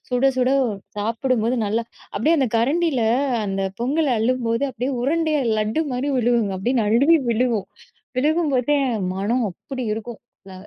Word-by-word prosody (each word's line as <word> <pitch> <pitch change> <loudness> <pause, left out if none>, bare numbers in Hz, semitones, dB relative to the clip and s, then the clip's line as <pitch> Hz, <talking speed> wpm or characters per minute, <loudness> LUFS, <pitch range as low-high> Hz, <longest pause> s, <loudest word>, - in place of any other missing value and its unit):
சுட, 250 +1 0
சுட 255 0 +2 0.5
சாப்புடும்போது, 230 +2 0
நல்லா 220 +3 0 0.3
அப்டியே 310 +11 +3
அந்த 265 -3 +2
கரண்டில, 280 +3 +1 0.5
அந்த 195 0 -2 0.2
பொங்கல் 285 +3 +1
அள்ளும்போது 235 +2 0
அப்டியே 250 +3 -3
உருண்டையா 310 +1 +1 0.2
லட்டு 215 +9 0
மாரி 255 +3 -2
விழுகும்ங்க 230 -5 +1
அப்டியே 245 +7 0
நழுவி 255 +10 +4
விழுகும் 230 -4 0 0.5
விழுகும்போதே, 295 -2 +2 0.4
மனம் 220 +5 0
அப்படி 260 +5 -7
இருக்கும்! 225 +1 -7 0.3
ல - - -10
250 Hz, 130 wpm, -22 LUFS, 225-280 Hz, 0.5 s, நழுவி